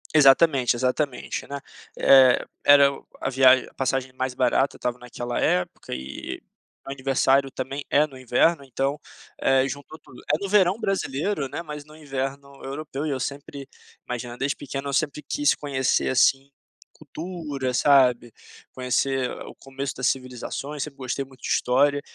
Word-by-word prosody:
Exatamente, 135 -3 +5
exatamente, 130 +2 -2
né? 140 0 -5 0.4
Eh, 130 -2 +6 0.2
era 140 -1 +7
o 140 - -12
a - - -1
viagem 130 -1 +5
a - - -27
passagem 130 0 -1
mais 130 0 -3
barata 130 +2 +1
estava 125 0 -3
naquela 120 0 -5
época 90 0 -1
e 65 +1 -6
o - - -33
meu - - -3
aniversário 135 0 +2
também 135 +3 -5
é 150 +2 +4
no 135 -3 -13
inverno, 135 +5 +2
então, 135 +2 -2 0.4
eh, 135 0 +3
juntou 145 +3 -8
tudo. 125 - -15
É - - +3
no 200 - -3
verão 195 0 +3
brasileiro, 190 - -1
né, 130 - -5
mas 150 -3 -8
no 155 0 -16
inverno 140 -1 -5
europeu 140 +1 -5
e - - -1
eu 135 - -2
sempre 140 0 -6 0.4
imagina, 120 0 -5
desde 140 +2 -1
pequeno 140 0 -5
eu - - -4
sempre 150 +1 0
quis 290 - +1
conhecer, 135 -3 0
assim, 135 +1 +3 0.4
cultura, 150 -4 -5
sabe. 125 -4 +4 0.4
Conhecer 130 0 0 0.2
o - - -11
começo 135 +1 -6
das 130 - 0
civilizações, 135 +3 -3
sempre 145 -2 -9
gostei 130 +1 -3
muito 135 -1 -18
de - - -5
história, 140 +3 +2
135 Hz, 160 wpm, -24 LUFS, 130-145 Hz, 0.4 s, era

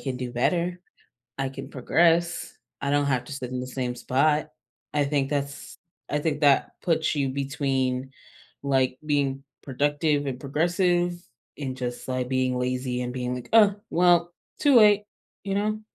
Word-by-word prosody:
can 135 -2 -3
do 125 -1 -5
better, 175 +8 0 0.6
I 135 -1 -1
can 135 0 -8
progress, 170 +6 +1 0.3
I 140 - -1
don't 145 0 +2
have 125 -2 +1
to 145 - -7
sit 130 -3 -5
in 125 - -2
the 125 - -5
same 125 -1 -3
spot. 150 +5 +1 0.4
I 145 -1 +2
think 140 -1 0
that's 140 -1 -4 0.3
I 150 - 0
think 150 -1 -1
that 140 -2 +4
puts 160 -2 +1
you 140 -2 0
between, 135 -1 -1 0.5
like, 130 -2 +1
being 140 -2 0 0.2
productive 145 +2 0
and 130 -2 -3
progressive 175 +5 +1 0.4
and 130 -3 -4
just, 125 -1 -5
like, 130 -1 -2
being 130 -1 +1
lazy 125 0 -2
and 125 0 -3
being, 125 0 -2
like, 125 - -8
"Uh, 210 -3 +7 0.2
well, 175 0 +3 0.3
too 285 -3 +4
late," 210 -2 +6 0.4
you 195 - -2
know? 215 +1 -1
140 Hz, 160 wpm, -26 LUFS, 130-165 Hz, 0.6 s, Uh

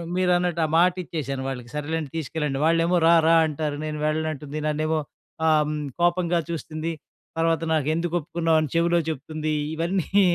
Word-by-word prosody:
మీరన్నట్టు, 180 -2 +1
ఆ - - -1
మాట 175 +1 +5
ఇచ్చేసాను 140 -5 -4
వాళ్ళకి 125 -3 -5
సరేలేండి 155 0 -3
తీసుకెళ్ళండి. 150 -3 -2
వాళ్ళేమో 165 +2 +3
రారా 165 0 +5
అంటారు. 150 -1 -3
నేను 155 0 -4
వెళ్ళనంటుంది 155 -1 -2
నన్నేమో 155 +1 0 0.5
ఆహ్, 155 -1 +3 0.3
కోపంగా 175 0 +2
చూస్తుంది. 160 0 -4 0.5
తర్వాత 165 0 +1
నాకు 155 -2 +1
ఎందుకు 170 +1 -2
ఒప్పుకున్నావు 165 +1 0
అని 155 - 0
నాకు 145 - -8
చెవిలో 170 +1 +3
చెప్తుంది. 155 +1 -3 0.2
ఇవన్నీ 185 +4 +1
160 Hz, 145 wpm, -24 LUFS, 150-170 Hz, 0.5 s, మాట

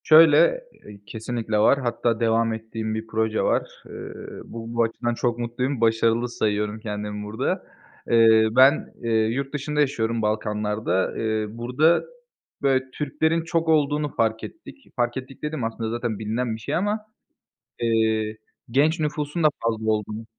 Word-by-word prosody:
Şöyle, 160 - +6 0.2
eee, 105 -1 -11
kesinlikle 110 -1 -3
var. 110 +6 +4
Hatta 115 -2 0
devam 115 0 +2
ettiğim 110 0 -4
bir 110 +1 -5
proje 110 0 0
var. - - 0
Eee, - - -12 0.5
bu 115 0 -8
bu 120 0 +3
açıdan 120 +1 -1
çok 120 0 -1
mutluyum. 120 +2 -2
Başarılı 115 +1 +2
sayıyorum 105 -1 -1
kendimi 105 -1 -5
burada. 105 +2 -2 0.5
Eee, 110 -1 +6
ben 130 +5 +4 0.4
yurt 135 +4 -3
dışında 150 +1 -2
yaşıyorum, 115 -5 +1
Balkanlar'da. 105 -3 -1
Eee, 110 -1 0
burada, 125 +9 +2 0.6
böyle, 135 -2 +2
Türklerin 160 +4 0
çok 165 0 -1
olduğunu 150 -1 +1
fark 110 -1 0
ettik. 330 - -10 0.2
Fark 120 0 0
ettik 130 0 -8
dediğim, 150 -4 -3
aslında 115 0 -3
zaten 120 -2 -3
bilinen 110 +2 -2
bir - - -9
şey - - -2
ama, 205 +4 0 0.8
eee, 110 -2 +1 0.3
genç 155 +7 +2
nüfusun 150 +2 -2
da - - +8 0.2
fazla 110 -1 0
olduğunu 110 +1 -2
115 Hz, 145 wpm, -24 LUFS, 110-140 Hz, 0.8 s, da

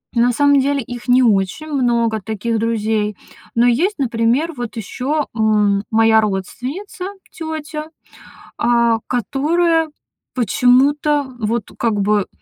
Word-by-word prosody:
На 240 +1 +3
самом 285 +2 +4
деле 280 +1 0
их 240 +2 -8
не 250 +1 +5
очень 205 +6 +1
много, 235 -6 0
таких 220 +3 -2
друзей. 215 -2 -1 0.4
Но 235 +1 +4
есть, 325 - +1
например, 245 +6 +1
вот 240 -1 -5
ещё, 275 +7 -2
м, 210 -2 +2
моя 225 0 +5
родственница, 250 - -4 0.3
тётя, 315 -2 -6 0.7
а, 235 -1 +3
которая, 315 - +1 0.4
почему-то, 275 +4 +2
вот 220 0 -2
как 230 -2 +1
бы, 205 0 +1
240 Hz, 115 wpm, -18 LUFS, 220-290 Hz, 0.7 s, не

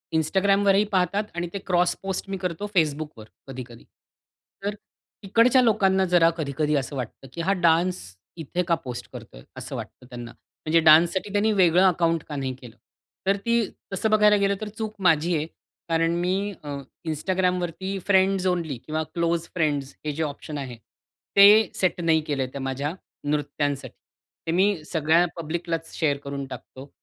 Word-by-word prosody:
Instagramवरही 195 +5 +3
पाहतात 190 +2 +1
आणि 175 0 -2
ते 200 - -3
क्रॉस 180 -1 +2
पोस्ट 195 0 -3
मी 195 - -3
करतो 180 +1 -3
Facebookवर 150 -7 -1 0.2
कधी-कधी. 125 -3 -9 0.8
तर 205 +1 -1 0.5
तिकडच्या 230 +6 +4
लोकांना 195 -5 +3
जरा 175 -2 +4
कधी-कधी 150 0 -1
असं 140 0 -2
वाटतं, 130 +1 -6
की 170 - -4
हा 190 +4 +2
डान्स 175 0 +2 0.4
इथे 170 +3 -2
का 170 - +3
पोस्ट 125 -2 -6
करतोय? - - -11 0.2
असं - - -6
वाटतं 125 - -8
त्यांना. 120 -1 -8
म्हणजे 160 +6 -2
डान्ससाठी 165 +5 +5
त्यांनी 210 +2 +2
वेगळं 180 -2 +4
अकाउंट 165 -2 +1
का 150 - -5
नाही 135 -2 -2
केलं? 120 -2 -12 0.5
तर 200 +1 +3
ती 235 -1 +2 0.3
तसं 220 +3 0
बघायला 210 -1 +5
गेलं 200 0 +1
तर 210 - -4
चूक 215 -1 -4
माझी 165 +1 +3
आहे. 150 - -2 0.4
कारण 165 0 +2
मी 190 +3 0
अ, 145 - -7 0.4
Instagramवरती 180 +3 -1
फ्रेंड्स 190 -1 +3
ओन्ली 170 -7 -1
किंवा 155 +1 -2
क्लोज 170 0 0
फ्रेंड्स 145 -5 -1
हे 150 - 0
जे 160 +2 -2
ऑप्शन 150 0 -5
आहे 130 -4 -6 0.6
ते 205 +1 +8
सेट 180 -1 0
नाही 160 -2 +3
केलं, 135 -3 0
त्या 140 - -5
माझ्या 135 +4 -2 0.4
नृत्यांसाठी. 145 -1 -2 0.5
ते - - +1
मी 185 -1 +2
सगळ्या 160 +2 +3
पब्लिकलाच 165 0 -4
शेअर 145 -3 +1
करून 140 -1 -5
टाकतो 130 +2 -10
170 Hz, 160 wpm, -25 LUFS, 150-190 Hz, 0.8 s, ते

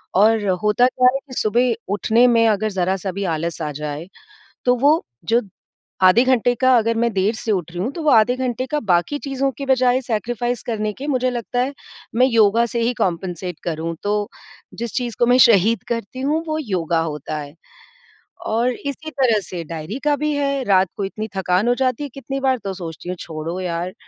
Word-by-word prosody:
और 215 +1 +4 0.2
होता 210 +4 +4
क्या 250 0 +3
है 270 - -1
कि 255 - -11
सुबह 240 +2 +2 0.2
उठने 225 +4 +3
में 230 -1 +4
अगर 215 0 +1
ज़रा-सा 190 0 -1
भी 200 +2 -4
आलस 165 +1 -4
आ 150 -1 -2
जाए 150 +3 -5 0.6
तो 250 0 +4
वो 290 +6 +3 0.2
जो 235 +2 +3 0.6
आधे 185 +7 +7
घंटे 245 -1 +3
का 255 +1 +4
अगर 230 +1 0
मैं 235 0 +1
देर 200 +3 +1
से 220 0 -2
उठ 175 -4 -2
रही 175 - -5
हूँ 245 - -1
तो 335 - -6
वो 300 - +3
आधे 240 +2 +4
घंटे 255 0 -2
का 300 0 0
बाकी 175 +12 +2
चीज़ों 275 -1 -1
की 275 - -4
बजाय 255 -1 +3
सैक्रिफ़ाइज़ 240 +1 -2
करने 215 -2 -2
के 275 +7 -7
मुझे 255 -3 +1
लगता 245 +1 -2
है, 275 +3 -1 0.4
मैं 250 +2 +5
योगा 230 -1 +4
से 235 0 -3
ही 240 +2 +1
कम्पेन्सेट 180 -1 -2
करूँ। 165 0 -3
तो 205 0 -1 0.5
जिस 235 -1 -5
चीज़ 240 -4 -2
को 240 - +3
मैं 250 +1 +5
शहीद 225 -2 +5
करती 235 +2 -4
हूँ 300 +4 0
वो 310 0 -1
योगा 175 - -1
होता 155 -1 -4
है। 145 0 -8 0.9
और 235 +3 +1
इसी 285 +5 -6
तरह 250 -6 +2
से 175 -3 -6
डायरी 165 - -6
का 295 -1 +3
भी 300 +1 -1
है, 280 -2 0
रात 190 -4 +3
को 200 - -1
इतनी 215 +3 -5
थकान 185 +4 +1
हो 245 - +3
जाती 260 +1 0
है 285 - -5
कितनी 275 0 -5
बार 265 -1 +2
तो 195 -1 -3
सोचती 170 -1 -8
हूँ 180 - -2
छोड़ो 160 +3 -5
यार, 180 0 -3
230 Hz, 205 wpm, -20 LUFS, 185-255 Hz, 0.9 s, आधे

